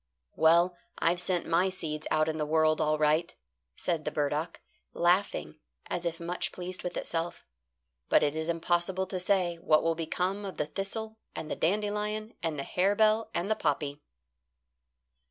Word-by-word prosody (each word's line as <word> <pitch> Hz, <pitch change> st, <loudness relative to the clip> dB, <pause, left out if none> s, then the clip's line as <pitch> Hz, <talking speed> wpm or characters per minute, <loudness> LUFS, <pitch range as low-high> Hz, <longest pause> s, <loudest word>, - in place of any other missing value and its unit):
"Well, 170 Hz, +3 st, +5 dB, 0.2 s
I've 175 Hz, +1 st, +2 dB
sent 180 Hz, -2 st, 0 dB
my 175 Hz, +3 st, +3 dB
seeds 155 Hz, -4 st, -4 dB
out 155 Hz, 0 st, +2 dB
in 160 Hz, 0 st, -1 dB
the 150 Hz, -, 0 dB
world 155 Hz, 0 st, +3 dB
all 155 Hz, 0 st, +2 dB
right," 155 Hz, +3 st, +2 dB, 0.4 s
said 170 Hz, -3 st, -1 dB
the -, -, -1 dB
burdock, 150 Hz, +2 st, -1 dB, 0.3 s
laughing 175 Hz, -, +1 dB, 0.3 s
as 175 Hz, -1 st, -2 dB
if 165 Hz, -1 st, -4 dB
much 170 Hz, +1 st, -2 dB
pleased 180 Hz, 0 st, -6 dB
with 180 Hz, -, -4 dB
itself; 170 Hz, +1 st, -3 dB, 0.6 s
"but -, -, +5 dB
it 145 Hz, 0 st, +1 dB
is 160 Hz, +1 st, -2 dB
impossible 175 Hz, +3 st, 0 dB
to 185 Hz, -1 st, -4 dB
say 180 Hz, -2 st, +1 dB
what 155 Hz, -2 st, +3 dB
will 165 Hz, -, +2 dB
become 180 Hz, +5 st, -2 dB
of 195 Hz, -2 st, -6 dB
the 150 Hz, -, 0 dB
thistle 220 Hz, +6 st, -4 dB, 0.2 s
and 155 Hz, -, -5 dB
the -, -, 0 dB
dandelion 210 Hz, +4 st, -1 dB
and 160 Hz, -3 st, -2 dB
the 140 Hz, -, -2 dB
harebell 215 Hz, +6 st, +2 dB
and 180 Hz, +5 st, -1 dB
the -, -, +4 dB
poppy." 145 Hz, -2 st, -1 dB
170 Hz, 165 wpm, -30 LUFS, 155-190 Hz, 0.6 s, Well